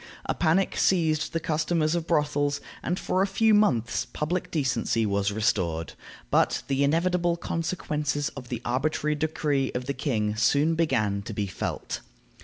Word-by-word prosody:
A - - 0
panic 175 +3 +1
seized 160 -4 +2
the 165 - -1
customers 155 0 0
of 170 -1 -2
brothels, 145 -3 +1 0.2
and 175 - -1
for 185 - 0
a 195 - +3
few 220 +3 +3
months 130 - +2
public 170 +4 -2
decency 130 -6 0
was 100 0 +1
restored. 90 -6 0 0.4
But - - +2
the 140 0 +1
inevitable 170 +3 +2
consequences 150 -4 -2
of 125 -3 -10
the 120 -1 -4
arbitrary 150 +4 0
decree 150 -3 0
of 125 0 -2
the 140 - -2
king 110 -6 -1
soon 145 +7 +3
began 125 -12 +1
to 105 - -7
be 105 - -1
felt. 95 - -4
150 Hz, 155 wpm, -26 LUFS, 120-165 Hz, 0.4 s, a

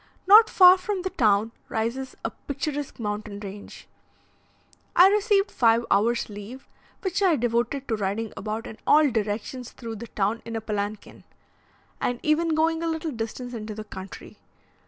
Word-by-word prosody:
Not 435 +4 +8
far 365 0 +7
from 370 0 -3
the 375 - -3
town 215 -1 +2 0.2
rises 235 +4 -3
a - - -1
picturesque 290 -1 -5
mountain 210 -1 -4
range. 205 0 -10 1.1
I 365 +2 +8
received 410 -1 +2
five 230 -1 +3
hours' 235 +4 +2
leave, 210 +6 -10 0.3
which 380 +1 -2
I 370 -5 +4
devoted 240 +2 -1
to 225 - 0
riding 210 +2 -3
about 215 +2 -4
in 220 - -9
all 300 -2 +5
directions 220 +3 -3
through 230 -2 -7
the 235 +3 -8
town 210 +2 -1
in 230 - -6
a 225 - -2
palanquin, 210 -1 -5 0.8
and 245 -1 -1
even 315 +1 +2
going 325 +1 +1
a 335 - -1
little 320 -1 -2
distance 245 +1 -5
into 215 -2 -6
the 215 - -6
country. 190 -2 -10
235 Hz, 155 wpm, -25 LUFS, 215-315 Hz, 1.1 s, Not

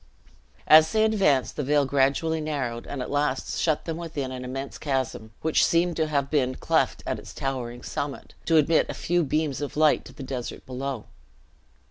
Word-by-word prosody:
As 155 +1 +7
they 220 0 +3
advanced, 170 - +2
the 145 - -1
vale 145 +1 +3
gradually 140 +4 +1
narrowed, 135 -6 -3
and 135 -3 -4
at - - -7
last 145 -2 -1
shut 155 -3 +1
them 165 -1 -3
within 155 -6 -4
an 125 -1 -6
immense 135 +2 -6
chasm, 130 -6 -2
which 160 0 +3
seemed 170 0 +2
to 160 -1 +1
have 140 -2 -1
been 130 -4 +1
cleft - - 0
at - - -2
its - - -11
towering 125 -3 -4
summit, 145 -1 -5
to 165 - +4
admit 155 +1 +3
a - - -4
few 175 0 +1
beams 150 -1 -1
of 145 0 -5
light 155 -1 +4
to - - -12
the 140 - -9
desert 130 -2 -5
below. 130 -2 -4
145 Hz, 185 wpm, -26 LUFS, 130-155 Hz, -, As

